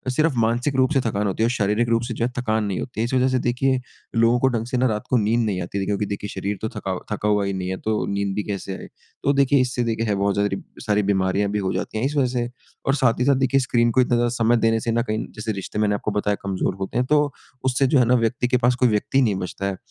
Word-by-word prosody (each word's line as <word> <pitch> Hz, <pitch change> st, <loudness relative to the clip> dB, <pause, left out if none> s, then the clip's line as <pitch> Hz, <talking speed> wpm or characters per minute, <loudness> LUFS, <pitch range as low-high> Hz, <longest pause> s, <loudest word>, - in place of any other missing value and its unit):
सिर्फ 155 Hz, +1 st, +2 dB
मानसिक 120 Hz, +5 st, +1 dB
रूप 130 Hz, +2 st, +3 dB
से 135 Hz, -, +3 dB
थकान 105 Hz, -3 st, -1 dB
होती 100 Hz, +3 st, -1 dB
है -, -, +4 dB
और -, -, +2 dB
शारीरिक 110 Hz, 0 st, +1 dB
रूप 115 Hz, 0 st, +2 dB
से 120 Hz, 0 st, -4 dB
जो 115 Hz, -, -1 dB
है 125 Hz, -, -2 dB
थकान 110 Hz, -3 st, 0 dB
नहीं 100 Hz, -3 st, -2 dB
होती 120 Hz, -4 st, -6 dB
है। 115 Hz, -, +2 dB
इस 120 Hz, -, -4 dB
वज़ह 130 Hz, 0 st, +3 dB
से 130 Hz, -1 st, +1 dB
देखिए 130 Hz, +2 st, +1 dB, 0.4 s
लोगों 115 Hz, +1 st, +4 dB
को 130 Hz, -, +3 dB
ढंग 115 Hz, -3 st, -2 dB
से 125 Hz, 0 st, -1 dB
ना 130 Hz, +1 st, +3 dB
रात 105 Hz, -2 st, -2 dB
को 125 Hz, -, +3 dB
नींद 110 Hz, +1 st, +2 dB
नहीं 95 Hz, -4 st, -1 dB
आती। 90 Hz, +3 st, -4 dB
देखिए 95 Hz, -, -1 dB
क्योंकि 105 Hz, +1 st, -1 dB
देखिए 100 Hz, 0 st, -4 dB
शरीर 100 Hz, +2 st, -3 dB
तो 110 Hz, -, -2 dB
थका 95 Hz, -, -4 dB, 0.2 s
थका 105 Hz, 0 st, -1 dB
हुआ 105 Hz, -1 st, +2 dB
ही 100 Hz, -, -2 dB
नहीं 95 Hz, -1 st, -3 dB
है 95 Hz, -, -2 dB
तो 110 Hz, +1 st, -1 dB
नींद 100 Hz, 0 st, -1 dB
भी 105 Hz, -, -1 dB
कैसे 100 Hz, -1 st, -4 dB
आए? -, -, -9 dB, 0.4 s
तो 140 Hz, -, +3 dB
देखिए 140 Hz, 0 st, +3 dB
इससे 125 Hz, -1 st, 0 dB
देखिए 115 Hz, -1 st, -1 dB
है 105 Hz, -, +1 dB
बहुत 100 Hz, 0 st, +1 dB
सारी, 100 Hz, -1 st, 0 dB, 0.2 s
सारी 105 Hz, -1 st, +1 dB
बीमारियाँ 100 Hz, 0 st, +1 dB
भी 105 Hz, -, 0 dB
हो 95 Hz, -2 st, -1 dB
जाती -, -, -3 dB
हैं 115 Hz, -, 0 dB
इस 145 Hz, +2 st, -1 dB
वज़ह 135 Hz, -3 st, +3 dB
से 120 Hz, 0 st, -2 dB, 0.4 s
और 135 Hz, -, +3 dB
साथ 125 Hz, -5 st, +2 dB
ही 125 Hz, -, +2 dB
साथ 140 Hz, 0 st, +4 dB
देखिए 135 Hz, +1 st, +2 dB
स्क्रीन 120 Hz, -2 st, +2 dB
को 130 Hz, -, +4 dB
इतना 125 Hz, -1 st, +2 dB
ज़्यादा 120 Hz, 0 st, +2 dB
समय 120 Hz, 0 st, +3 dB
देने 115 Hz, 0 st, +2 dB
से 115 Hz, -, -2 dB
ना 115 Hz, +1 st, +2 dB
कहीं 110 Hz, +1 st, -1 dB
जैसे 110 Hz, +1 st, -3 dB
रिश्ते 100 Hz, +1 st, -5 dB
मैंने 105 Hz, -1 st, +2 dB
आपको 105 Hz, -, -3 dB
बताया 105 Hz, 0 st, 0 dB
कमज़ोर 95 Hz, -1 st, -1 dB
होते 95 Hz, +4 st, -3 dB
हैं। 125 Hz, -, +2 dB
तो 150 Hz, +1 st, +4 dB, 0.4 s
उससे 130 Hz, +1 st, +2 dB
जो 135 Hz, +1 st, +4 dB
है 125 Hz, -, +4 dB
ना 125 Hz, +2 st, +4 dB
व्यक्ति 120 Hz, +1 st, 0 dB
के 125 Hz, -, +2 dB
पास 125 Hz, 0 st, +2 dB
कोई 125 Hz, -, +6 dB
व्यक्ति 110 Hz, +5 st, +1 dB
नहीं 110 Hz, -6 st, +2 dB
बचता 95 Hz, +1 st, -4 dB
है। 100 Hz, -, 0 dB
अ, -, -, -9 dB
115 Hz, 300 wpm, -23 LUFS, 100-125 Hz, 0.4 s, कोई